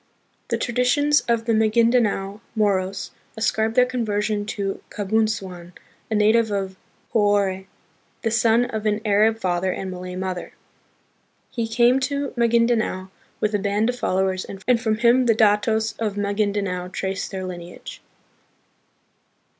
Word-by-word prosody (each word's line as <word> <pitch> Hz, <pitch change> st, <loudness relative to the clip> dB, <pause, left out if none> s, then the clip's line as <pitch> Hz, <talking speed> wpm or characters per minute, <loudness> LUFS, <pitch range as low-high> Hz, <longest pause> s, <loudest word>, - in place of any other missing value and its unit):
The -, -, 0 dB
traditions 255 Hz, +5 st, +2 dB
of 230 Hz, -1 st, +1 dB
the 230 Hz, -, +1 dB
Magindanao 220 Hz, -2 st, +2 dB
Moros 195 Hz, -3 st, 0 dB, 0.3 s
ascribe 220 Hz, 0 st, 0 dB
their 250 Hz, -, +6 dB
conversion 210 Hz, -4 st, -1 dB
to 200 Hz, -2 st, -3 dB
Kabunsuan, 200 Hz, -4 st, -2 dB, 0.4 s
a 220 Hz, -, 0 dB
native 220 Hz, +2 st, +3 dB
of 195 Hz, -2 st, -3 dB, 0.4 s
Johore, 200 Hz, -3 st, +1 dB, 0.6 s
the 225 Hz, -, 0 dB
son 230 Hz, +1 st, +3 dB
of 220 Hz, -3 st, -3 dB
an 210 Hz, 0 st, 0 dB
Arab 215 Hz, +2 st, +3 dB
father 185 Hz, -3 st, 0 dB
and 190 Hz, +1 st, -4 dB
Malay 180 Hz, 0 st, -7 dB
mother. 185 Hz, -1 st, -4 dB, 1.0 s
He 230 Hz, -2 st, -2 dB
came 240 Hz, +3 st, +3 dB
to 280 Hz, +1 st, -2 dB
Magindanao 230 Hz, -5 st, +1 dB, 0.3 s
with 215 Hz, 0 st, 0 dB
a 205 Hz, -, +1 dB
band 205 Hz, +3 st, 0 dB
of 250 Hz, -, -1 dB
followers, 190 Hz, -2 st, 0 dB
and 230 Hz, +5 st, -1 dB
from 220 Hz, -2 st, 0 dB
him 240 Hz, +2 st, +4 dB
the 225 Hz, -, +4 dB
datos 220 Hz, +1 st, +2 dB
of 210 Hz, -3 st, -2 dB
Magindanao 200 Hz, -3 st, -1 dB
trace 190 Hz, +1 st, -3 dB
their 190 Hz, -1 st, -5 dB
lineage. 175 Hz, -1 st, -9 dB
215 Hz, 130 wpm, -23 LUFS, 195-230 Hz, 1.0 s, their